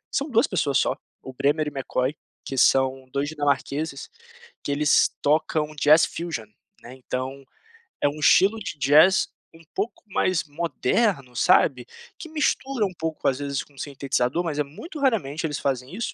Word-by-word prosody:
são 280 - -1
2 235 -3 +3
pessoas 145 -7 +1
só, - - +1 0.3
o 130 - -8
Bremer 145 +3 +1
e - - -3
McCoy, 135 0 -2 0.3
que 135 - -5
são 130 0 +3
2 140 +1 -1
dinamarqueses, 145 -1 -2 0.5
que - - -3
eles 145 +1 +3
tocam 155 0 +1
jazz 150 +2 +6
fusion, 165 -10 -5 0.4
né, 120 - -11
então, 130 +1 -5 0.6
é - - +5
um 150 +2 -8
estilo 195 +8 +4
de 195 -7 -6
jazz 150 +7 +5 0.3
um 165 - -16
pouco 205 +5 -4
mais 185 -3 0
moderno, 150 - -1
sabe, 125 0 +3 0.3
que 325 - -8
mistura 275 -6 0
um 185 - -4
pouco 160 -1 -3
às 130 -1 +1
vezes 140 -1 -2
com 145 - -24
sintetizador, 135 +2 -1
mas 155 -4 -3
é - - +3
muito 290 - -10
raramente 175 - 0
eles 150 -2 -4
fazem 130 +3 -2
isso 235 - -3
150 Hz, 165 wpm, -24 LUFS, 135-175 Hz, 0.6 s, jazz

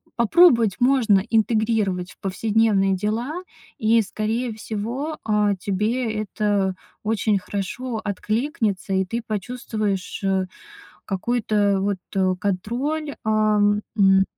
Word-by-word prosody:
попробовать 235 - +5
можно 245 -6 +4
интегрировать 215 -5 +1
в - - -19
повседневные 200 0 +2
дела. 235 - -2 0.3
И, 225 +1 +3
скорее 220 +4 -2
всего, 235 +8 -4
а, 210 -2 +2
тебе 215 +6 -1
это 205 -2 0 0.3
очень 215 -1 +1
хорошо 220 +5 -4
откликнется, 215 - -1
и 190 0 +2
ты 230 +6 -3
почувствуешь, 215 -3 -3
э, 190 -1 +1 0.6
какой-то, 215 +3 -1
э, 200 -1 +3
вот, 200 -1 0 0.2
э, 185 -1 +2
контроль, 250 +11 -2
ам, 210 -1 +3 0.2
м, 195 -1 +5
215 Hz, 110 wpm, -23 LUFS, 195-230 Hz, 0.6 s, попробовать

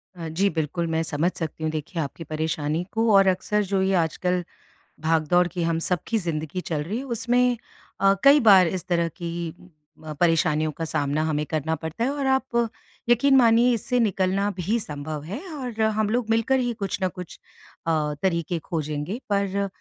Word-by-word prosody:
अ, 165 -2 -6
जी 195 +5 +1
बिल्कुल 160 +2 -1
मैं 160 0 0
समझ 160 +4 0
सकती 160 -1 -5
हूँ 155 - 0
देखिए 160 +2 -4
आपकी 150 +3 -5
परेशानी 155 +1 -2
को 225 0 +2
और 195 -1 +6
अक्सर 210 +3 +1
जो 195 -1 +1
ये 190 0 +1
आजकल 180 +2 0 0.6
भागदौड़ 165 +2 +2
की 175 -1 -3
हम 165 0 0
सबकी 180 +6 -1
ज़िंदगी 165 -1 -3
चल 150 -2 -1
रही 215 - -3
उसमें 245 +1 +2 0.4
अ, 195 0 +5
कई 280 +2 +8
बार 190 -4 +8
इस 185 0 -3
तरह 170 -2 +1
की 170 0 -6 0.8
अ, 155 - -5
परेशानियों 155 -2 +2
का 165 +2 -5
सामना 145 0 -1
हमें 150 -1 -1
करना 160 +1 0
पड़ता 160 +7 -4
है। 255 - +1
और 285 -1 -3
आप 250 -3 +1 0.4
यकीन 270 +3 +5
मानिए 235 0 +5
इससे 245 +2 0
निकलना 195 -1 +1
भी 215 +7 0
संभव 150 -3 -6
है 190 - -5 0.2
और 245 -5 -4
हम 215 -1 +1
लोग 230 -1 -1
मिलकर 230 +4 +2
ही 245 -1 0
कुछ 200 -3 -4
न 185 - +3
कुछ 180 -2 -9 0.5
अ, - - +3 0.3
तरीके 170 -2 0
खोजेंगे 155 - -3
पर 200 0 0
180 Hz, 180 wpm, -24 LUFS, 160-220 Hz, 0.8 s, कई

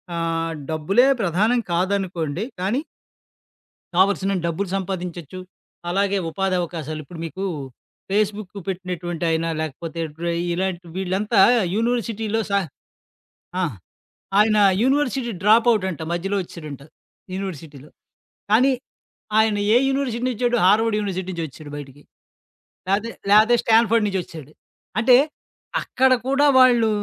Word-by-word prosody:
ఆహ్, 165 0 -1 0.2
డబ్బులే 195 - +3
ప్రధానం 205 +7 +2
కాదనుకోండి. 180 -2 -1 0.2
కానీ 225 +10 0 1.1
కావాల్సినంతా 195 -1 +2
డబ్బులు 180 +3 -2
సంపాదించొచ్చు, 180 -3 -5 0.5
అలాగే 200 +2 +1
ఉపాధవకాశాలు. 170 -4 -2
ఇప్పుడు 160 +3 -11
మీకు 185 +4 -6 0.7
ఫేస్‌బుక్ 210 -1 -1 0.2
పెట్టినటువంటయినా 175 -3 -2
లేకపోతే 160 +2 -5 0.2
డ్ర 170 +2 -4 0.3
ఇలాంటి 180 -1 -3
వీళ్ళంతా 195 +3 0 0.4
యూనివర్సిటీలో 225 -1 -1
సా 200 - +3 1.0
ఆ! - - +1 0.8
ఆయన 215 0 +4 0.3
యూనివర్సిటీ 265 -3 +1
డ్రాపవుటంట 210 -4 +3
మధ్యలో 195 +4 -2
ఒచ్చేడంట 155 -5 -9 0.5
యూనివర్సిటీలో. 155 -7 -7 0.6
కానీ 255 +5 +5 0.7
ఆయన 220 -1 +3 0.2
ఏ - - +8
యూనివర్సిటీనుచ్చాడు, 250 -2 0
హార్వర్డ్ 215 +3 +4
యూనివర్సిటీ 190 -2 -3
నుంచోచ్చాడు 155 -2 -7
బయటికి. 145 0 -10 0.9
లేతే, 210 +4 0 0.2
లేతే 220 +3 +6
స్టాండ్ 225 -1 +4
ఫర్డ్ 230 -2 +3
నుంచోచ్చాడు. 170 -6 -5 0.5
అంటే, 245 +2 +6 0.7
అక్కడ 260 0 +2
కూడా 275 +2 +3
వాళ్ళు 240 -3 +5
195 Hz, 100 wpm, -22 LUFS, 170-225 Hz, 1.1 s, ఏ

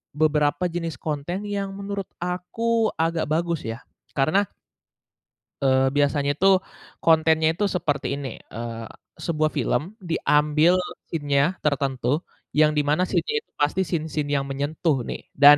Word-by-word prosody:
beberapa 150 +2 +2
jenis 165 -3 -3
konten 155 +5 -3
yang 200 -1 -3
menurut 200 0 -4 0.2
aku 220 +6 0
agak 165 0 0
bagus 165 0 0
ya 115 +3 -5 0.3
karena 155 +9 +3 1.2
eee, 130 0 +4
biasanya 145 0 +2
tuh 195 0 +7 0.5
kontennya 160 -1 +4
itu 205 +5 0
seperti 150 -5 0
ini, 140 -1 -4 0.3
eee, 115 0 -5 0.4
sebuah 155 -2 +1
film - - +1 0.3
diambil 150 +1 +3 0.4
scene-nya 145 -4 +1 0.2
tertentu, 135 -4 0 0.5
yang 150 0 +5
di - - +5
mana 160 +5 +3
scene-nya 455 - 0
itu - - -48
pasti 150 +6 +2
scene-scene 155 -3 -2
yang 135 - -1
menyentuh 145 +2 0
nih - - -4
dan 145 +1 +9
155 Hz, 130 wpm, -24 LUFS, 145-175 Hz, 1.2 s, dan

